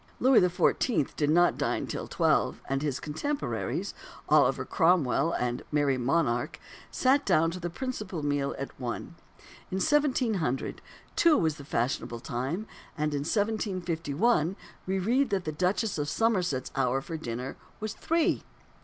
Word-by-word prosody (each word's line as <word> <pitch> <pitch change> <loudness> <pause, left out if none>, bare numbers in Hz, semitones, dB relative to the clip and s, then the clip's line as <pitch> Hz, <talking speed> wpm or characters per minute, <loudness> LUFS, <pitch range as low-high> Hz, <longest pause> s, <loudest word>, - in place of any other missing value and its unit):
Louis 260 -1 +6
XIV. 180 - +1
did 145 -1 +1
not 175 +3 +4
dine - - 0
till - - -5
twelve; - - +1
and 135 0 -1
his 145 -3 -1
contemporaries, 285 - -3 0.4
Oliver - - +4
Cromwell 165 - +3
and 120 0 -1
the - - -14
Merry 145 -3 +2
Monarch, 125 +1 0 0.3
sat 270 +2 +3
down 165 - +3
to 180 - -6
the 175 0 -3
principal 210 - -4
meal 145 -1 0
at 135 - -5
one. 125 +5 -4 0.6
In - - -3
1700, 225 - +1 0.3
two 330 -3 +5
was 160 -3 +1
the 140 - -9
fashionable 120 -2 -2
time; 135 - -3 0.3
and 150 0 0
in 145 - 0
1751 185 -1 0 0.3
we 190 +1 0
read 245 +9 +2
that 195 -3 -1
the 155 - -1
Duchess 185 +4 0
of 145 0 -1
Somerset's 180 - 0
hour 135 0 +2
for 165 - -6
dinner 125 -3 -5 0.2
was 215 0 -3
three. 330 +6 +1
165 Hz, 145 wpm, -29 LUFS, 140-210 Hz, 0.6 s, Louis